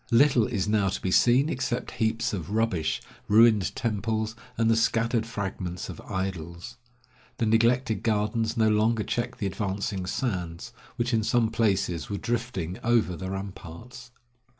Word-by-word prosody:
Little 120 -2 +4
is 105 -5 -1
now 105 -2 +2
to - - -3
be 95 - -2
seen 125 +8 +5
except 130 -5 -2
heaps 110 0 0
of 90 -4 -4
rubbish, 105 -7 0 0.2
ruined 110 -2 +5
temples, 110 0 -1 0.2
and 115 0 +2
the 115 - +4
scattered 115 0 +1
fragments 95 -5 -4
of - - -8
idols. 85 -2 -5 0.6
The 115 - +1
neglected 115 0 +2
gardens 110 +1 0
no 110 -1 +4
longer 110 +1 +2
check 120 +3 -2
the 105 - -3
advancing 100 -1 -2
sands, 90 -3 -3 0.2
which 120 0 -1
in 110 - +3
some 115 +1 +2
places 100 -7 0
were 100 - -2
drifting 110 -7 -3
over 115 -6 +2
the 95 +3 -5
ramparts. 95 +5 -8
110 Hz, 150 wpm, -27 LUFS, 95-115 Hz, 0.6 s, seen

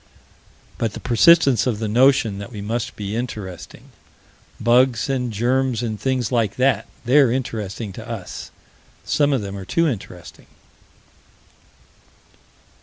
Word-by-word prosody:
But 115 -3 -1
the - - -7
persistence 135 -1 +4
of 120 -4 0
the 110 0 -3
notion 115 -3 +3
that 100 +4 -8
we 105 - -8
must 115 +4 -3
be 105 0 -5
interesting. 105 -7 -7 0.7
Bugs 125 +2 +3
and 125 -3 -1
germs 125 +2 0
and 110 -3 -4
things 130 -3 -1
like 115 -4 +1
that: 130 0 +1 0.2
they're 130 0 +5
interesting 110 -5 -4
to 115 +4 -10
us: 115 -6 -7 0.6
some 145 -1 +2
of 130 -6 0
them 100 0 -6
are 100 - -6
too 165 - +1
interesting. 95 - -7
120 Hz, 130 wpm, -21 LUFS, 105-130 Hz, 0.7 s, they're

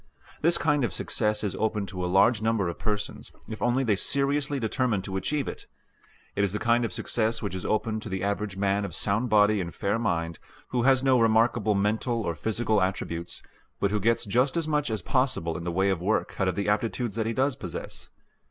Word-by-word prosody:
This 170 +2 +4
kind 150 -3 +1
of 110 -7 -1
success 105 +4 0
is 100 - -1
open 105 -2 -1
to 95 -2 -5
a - - 0
large 105 +4 +4
number 110 -4 +1
of 85 - -5
persons, 105 -1 -3 0.2
if 110 - -7
only 120 +2 +2
they 110 -5 +2
seriously 140 +5 +1
determine 110 -3 0
to 95 0 -5
achieve 135 +9 -1
it. - - -7 0.7
It 100 - +1
is 100 -1 0
the - - 0
kind 120 +2 +2
of 115 - -2
success 110 -1 -1
which 100 - -3
is 95 - -5
open 110 0 0
to 110 - -7
the 95 -1 -3
average 100 -1 -2
man 100 +1 +1
of 95 -5 -5
sound 105 +5 0
body 105 -1 +4
and 85 -1 -4
fair 100 +6 -1
mind, 85 -7 -1 0.3
who 125 - 0
has 130 +1 +4
no 130 -2 +4
remarkable 110 -1 +3
mental 110 +4 0
or 85 - -1
physical 110 +5 0
attributes, 85 -2 -3 0.4
but 100 - +1
who 105 - +1
gets 115 +4 +1
just 125 +9 +1
as 165 -2 0
much 150 -2 0
as 110 -5 -2
possible 130 - 0
in 85 - -5
the 85 - -1
way 95 +3 +2
of 90 -3 -2
work 105 +5 0
out 95 - +2
of 95 - 0
the 100 0 -2
aptitudes 110 +1 -1
that 110 -1 -1
he 115 - -1
does 135 +2 +1
possess. 90 -10 -7
110 Hz, 220 wpm, -27 LUFS, 100-120 Hz, 0.7 s, This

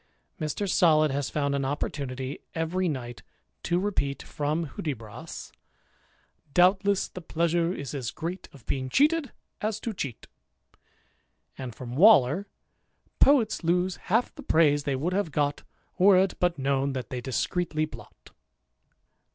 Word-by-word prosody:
Mr. 155 +6 -2
Solid 155 -5 +4
has 140 0 -1
found 140 -2 -1
an 140 -1 0
opportunity 135 -1 -3 0.2
every 170 +3 0
night 120 -5 -5 0.4
to 175 - 0
repeat, 180 -8 -1
from 150 +3 -2
Hudibras, 130 0 -6 0.5
" 145 - -36
Doubtless 190 +2 +4
the 185 - -9
pleasure 170 +1 0
is 140 -8 -5
as 130 -5 -3
great 175 +3 -6
Of 135 -6 -16
being 130 -1 -2
cheated, 295 - +2 0.3
as 215 0 -1
to 230 - -3
cheat; 140 - -5 0.7
" - - -42
and 125 -4 -6
from 125 -1 -7
Waller, 185 - +6 0.4
" - - -43
Poets 255 -9 +4
lose 180 +2 +1
half 225 +6 +2
the - - -10
praise 145 -2 +3
they 140 -3 0
would 160 +8 -1
have 195 -4 0
got, 145 0 0 0.4
Were 190 +1 +7
it 190 0 +3
but 175 -2 +1
known 135 0 0
that 130 -4 -5
they 125 -1 -3
discreetly 155 +5 -1
blot." 155 - -14
155 Hz, 145 wpm, -27 LUFS, 140-185 Hz, 0.7 s, Were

